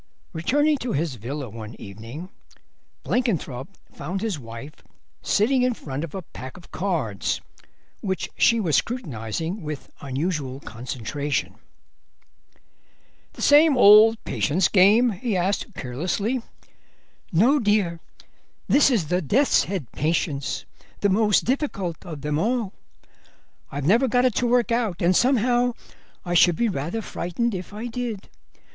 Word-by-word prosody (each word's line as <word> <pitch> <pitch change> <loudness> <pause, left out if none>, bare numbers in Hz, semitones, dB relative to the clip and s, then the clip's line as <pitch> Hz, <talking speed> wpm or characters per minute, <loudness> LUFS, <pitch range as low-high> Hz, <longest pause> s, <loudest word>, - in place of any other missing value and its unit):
Returning 290 - +2
to 250 -1 -3
his 155 0 -1
villa 130 +5 -5
one 110 0 -9
evening 115 - -9 0.7
Blenkinthrope 170 - -1 0.2
found 175 +7 -4
his 210 -8 -2
wife 115 +4 -9 0.5
sitting 250 +5 +2
in 250 -1 +2
front 140 -4 -5
of 165 0 -6
a 190 - -5
pack 130 -2 -10
of 175 - -16
cards, 160 - -1 0.6
which 190 -2 -2
she 230 - +4
was 170 -8 +1
scrutinising 165 - -2
with 150 -3 -7
unusual 140 -1 -3
concentration. 130 +4 -4 1.8
"The - - -6
same 295 -1 +6
old 220 0 +8
patience 175 +5 +1
game?" 210 +5 +5
he 205 +1 -2
asked 195 +4 -1
carelessly. 180 - -2 0.9
"No, 240 - +4
dear; 205 -7 +1 0.7
this 285 - +5
is 200 - 0
the 180 +1 +1
Death's 250 - +3
Head 175 - -4
patience, 150 -3 -1 0.4
the 200 - +3
most 210 +1 +3
difficult 215 - -2
of 160 -6 -8
them 150 +1 -1
all. 225 0 0 1.0
I've 140 0 -4
never 230 - +4
got 245 +1 +2
it 250 - +3
to 245 - +2
work 240 0 +2
out, 230 -6 0
and 180 +2 +3
somehow 245 0 +3 0.5
I 175 - -2
should 175 0 +5
be 235 +6 +1
rather 175 +6 -3
frightened 225 +8 -2
if 185 0 -6
I 215 +3 -6
did. 240 -4 -5
185 Hz, 135 wpm, -24 LUFS, 145-235 Hz, 1.8 s, old